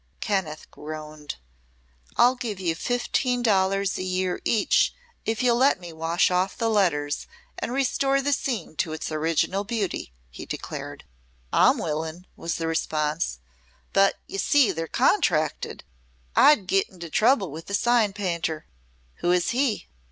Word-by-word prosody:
Kenneth 190 -8 -2
groaned. 155 -1 -7 0.8
"I'll 245 +1 +6
give 230 -6 -5
you 175 -3 0
fifteen 245 +5 0
dollars 195 -2 +2
a - - -2
year 185 0 -1
each 235 - +2 0.3
if 225 +2 0
you'll 240 -1 +4
let 265 -3 +4
me 175 -2 -9
wash 165 +3 +1
off 185 +2 0
the 225 -1 +1
letters 150 -9 +1 0.3
and - - -3
restore 275 +1 +1
the 285 +1 +1
scene 245 - -2
to 160 -3 -1
its 160 - -5
original 165 +5 0
beauty," 205 - -3 0.2
he - - -9
declared. - - -6 0.5
"I'm - - +5
willin'," 160 +3 -3
was 165 0 -3
the 165 - -3
response. 155 - -1 0.5
"But 195 0 +4
ye 195 - -5
see 275 -5 +4
they're 165 -2 -4
contracted. - - +1 0.5
I'd 265 -10 +6
git 195 +1 +1
into 170 -3 -10
trouble 215 - +3
with 160 +3 -8
the 200 - -1
sign 235 -2 +3
painter." 170 -5 -2 0.5
"Who 175 - +1
is 180 -1 +2
he?" 250 -3 0
190 Hz, 145 wpm, -25 LUFS, 165-230 Hz, 0.8 s, I'll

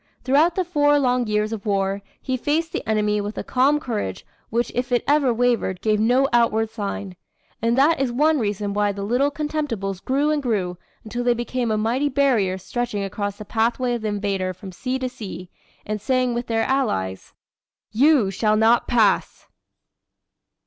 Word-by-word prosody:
Throughout 305 +6 +3
the 370 - 0
four 290 -4 +3
long 250 -3 +1
years 210 +1 0
of 210 -3 -5
war, 195 -1 0 0.2
he 260 - -2
faced 310 +6 -1
the - - -2
enemy 210 -1 +1
with 205 +1 -5
a - - -3
calm 275 +4 +2
courage 215 - -4 0.2
which 235 +1 -1
if 250 +1 -2
it 245 - +2
ever 285 -3 +3
wavered 235 -6 0
gave 215 0 +1
no 250 +5 +3
outward 225 -2 +2
sign. 200 -3 -5 0.5
And 230 +2 +1
that 290 +4 +4
is 265 -3 0
one 300 +4 +2
reason 205 -2 -2
why 205 0 +1
the 200 0 -5
Little 250 +7 +2
Contemptibles 285 - -3
grew 285 +3 +1
and 300 -1 0
grew 190 -8 -2 0.2
until 240 +2 -4
they 245 -1 +3
became 240 0 -2
a 215 - +1
mighty 240 +7 0
barrier 250 -9 +2
stretching 210 +1 -3
across 205 +1 -4
the 210 - -8
pathway 235 +4 0
of 240 - -3
the 215 - -2
invader 200 -3 -2
from 190 +1 -10
sea 255 +8 -3
to 260 -1 -2
sea, 190 -7 -8 0.3
and 210 -1 -3
saying 255 +1 +1
with 240 +1 -3
their 225 -1 +1
Allies: 210 - -1 0.6
"You 255 -3 +4
shall 215 +2 +1
not 225 +2 +3
pass!" 220 -5 +1
230 Hz, 180 wpm, -22 LUFS, 205-260 Hz, 0.6 s, that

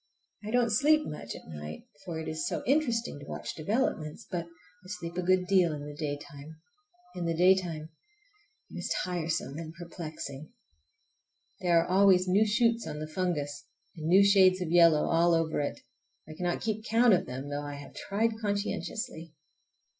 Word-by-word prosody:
I 210 - -5
don't 240 0 +2
sleep 300 +7 +4
much 115 -6 -6
at - - -12
night, 75 -1 -8 0.2
for 170 -3 -5
it 160 - -6
is 155 0 -2
so - - -3
interesting 240 - +1
to 145 - -10
watch - - -5
developments; 160 - -2
but 175 -3 -2 0.4
I - - -14
sleep 175 -3 -6
a 180 - -1
good 185 +1 +2
deal 180 -4 +3
in 145 -1 -6
the 145 - -7
daytime. 145 0 -6 0.5
In 175 - -4
the 165 -1 -1
daytime 175 -4 +2 0.8
it - - -7
is - - -4
tiresome 160 -4 -2
and 160 0 -8
perplexing. 155 -4 -8 1.1
There 170 -2 +3
are - - -7
always 185 -1 +5
new 200 +4 +4
shoots 230 +2 +2
on 150 - -5
the 155 - -4
fungus, 150 -4 -3 0.3
and 160 -2 -5
new 190 +4 +6
shades 190 -2 +5
of 175 -3 -3
yellow 170 -3 +6
all 170 0 +4
over 165 -2 0
it. 145 - -4 0.5
I 155 - -8
cannot 175 +2 -2
keep 220 -1 -2
count 230 0 +4
of 185 - +1
them, 130 +3 -6
though 145 0 -3
I 145 0 -6
have 140 0 -10
tried 220 +2 -1
conscientiously. 205 -4 -3
175 Hz, 175 wpm, -29 LUFS, 155-200 Hz, 1.1 s, new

